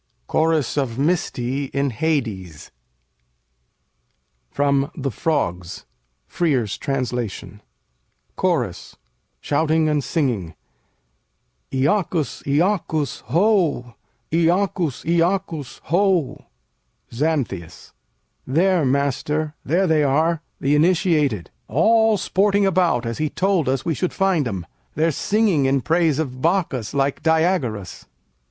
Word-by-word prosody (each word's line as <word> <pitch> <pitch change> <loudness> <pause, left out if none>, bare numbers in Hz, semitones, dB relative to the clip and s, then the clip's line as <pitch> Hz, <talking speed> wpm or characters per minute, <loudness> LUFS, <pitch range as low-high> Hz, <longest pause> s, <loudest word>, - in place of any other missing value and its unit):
CHORUS 160 - +1
OF 130 -5 -1
MYSTÆ 140 -4 -1
IN 140 -1 -1
HADES 110 - -3 1.8
From 140 - +1
'The 140 -4 -3
Frogs': 90 - -2 0.4
Frere's 130 - 0
Translation 125 -6 -3 0.7
CHORUS 140 - -1 0.5
[shouting 155 +2 +1
and 150 -2 +1
singing'] 115 - -1 1.2
Iacchus! 155 +3 0
Iacchus! 155 -1 0
Ho! 165 - +1 0.4
Iacchus! 170 -3 +1
Iacchus! 170 -3 -1
Ho! 180 -3 +1 0.7
Xanthias 120 - -3 0.5
There, 175 +5 +2
master, 140 +3 0
there 175 +7 +1
they 160 -3 +3
are, 155 +4 +1 0.2
the 140 +2 +1
initiated 155 - +2 0.2
All 220 - +3
sporting 200 +1 +2
about 175 -10 +2
as 115 0 -4
he 155 -1 0
told 185 -6 +1
us 135 -1 -1
we 165 - +1
should 180 +4 -2
find 185 -8 +1
'em. 95 -6 -4 0.3
They're 160 +2 +2
singing 200 -3 +1
in 135 0 +2
praise 160 +1 +2
of 130 -5 -3
Bacchus 160 - 0
like 140 0 0
Diagoras. 160 - 0
150 Hz, 100 wpm, -21 LUFS, 130-170 Hz, 1.8 s, they